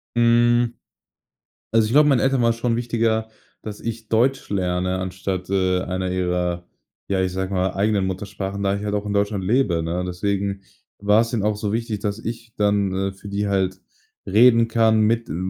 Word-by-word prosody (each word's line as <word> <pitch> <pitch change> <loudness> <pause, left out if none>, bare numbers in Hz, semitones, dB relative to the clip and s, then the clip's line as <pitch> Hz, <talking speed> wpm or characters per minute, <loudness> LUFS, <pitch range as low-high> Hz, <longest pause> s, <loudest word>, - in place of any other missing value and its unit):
Hm. 120 0 +3 1.0
Also, 115 -1 +4
ich 115 - -3
glaube, 150 +1 +6
meinen 135 -4 +3
Eltern 135 -2 +2
war 115 - +4
es 115 - -1
schon 115 0 0
wichtiger, 115 -2 0 0.3
dass 105 -1 -7
ich 115 -1 -6
Deutsch 130 +4 +1
lerne 90 -1 -1
anstatt, 95 0 -4
äh, 95 -1 +1
einer 95 0 -3
ihrer, 90 -1 -1 0.4
ja, 95 -1 0
ich 95 -1 0
sage 95 +1 -3
mal, 95 0 0
eigenen 100 -1 +1
Muttersprachen, 100 +1 -4
da 100 0 +1
ich 100 - -5
halt 105 0 -2
auch 105 0 -1
in 100 - -2
Deutschland 100 -1 0
lebe, 100 -7 +1
ne? 85 +2 -2
Deswegen 100 +2 -2 0.4
war's 105 +3 +3
denen 110 -4 -1
auch 105 0 +1
so 105 0 -3
wichtig, 115 -3 -2
dass 105 0 -2
ich 115 0 -7
dann, 100 -2 +1
äh, 95 0 -1
für 95 +1 -12
die 100 +1 -2
halt 95 -1 0 0.5
reden 115 +3 +5
kann, 110 -1 +3
mit 115 +2 +1
m - - -4
100 Hz, 190 wpm, -22 LUFS, 95-115 Hz, 1.0 s, glaube